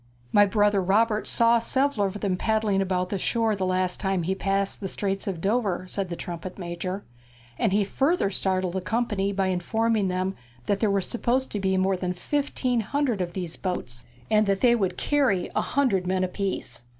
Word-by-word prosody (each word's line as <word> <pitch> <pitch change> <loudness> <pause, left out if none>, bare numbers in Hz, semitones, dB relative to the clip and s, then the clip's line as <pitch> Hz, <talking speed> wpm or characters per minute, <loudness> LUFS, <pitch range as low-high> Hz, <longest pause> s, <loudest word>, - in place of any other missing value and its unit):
'My 205 0 +6
brother 205 -1 +3
Robert 210 +3 +2
saw 235 0 +4
several 260 -2 +1
of 200 +2 -6
them 195 -3 0
paddling 215 0 +1
about 185 -1 -1
the 200 - -2
shore 225 +1 +1
the 190 -2 -1
last 185 0 +1
time 190 -3 0
he 185 +3 0
passed 195 0 0
the 195 - -4
Straits 195 +1 -2
of 180 -4 -3
Dover,' 200 -3 0
said 190 0 -3
the 170 - -3
trumpet 175 +1 -6
major; 180 +2 -4 0.6
and 215 - +2
he 205 +1 +3
further 270 - +1
startled 185 -2 0
the 190 - -2
company 210 -2 0
by 195 -1 0
informing 215 +3 +1
them 185 +1 -1 0.3
that 200 - 0
there 215 - +2
were 200 0 +2
supposed 240 +5 -1
to 210 - -2
be 190 -1 +1
more 190 +1 +2
than 180 0 -2
fifteen 255 +3 -1
hundred 240 -1 0
of 175 -1 -3
these 175 -3 -4
boats, 125 -11 -4 0.3
and 215 -1 +4
that 195 -1 +1
they 245 -2 +5
would 190 -6 0
carry 265 -11 +1
a - - +3
hundred 220 -10 +1
men 185 0 +1
apiece. 185 - -3
195 Hz, 195 wpm, -26 LUFS, 185-220 Hz, 0.6 s, My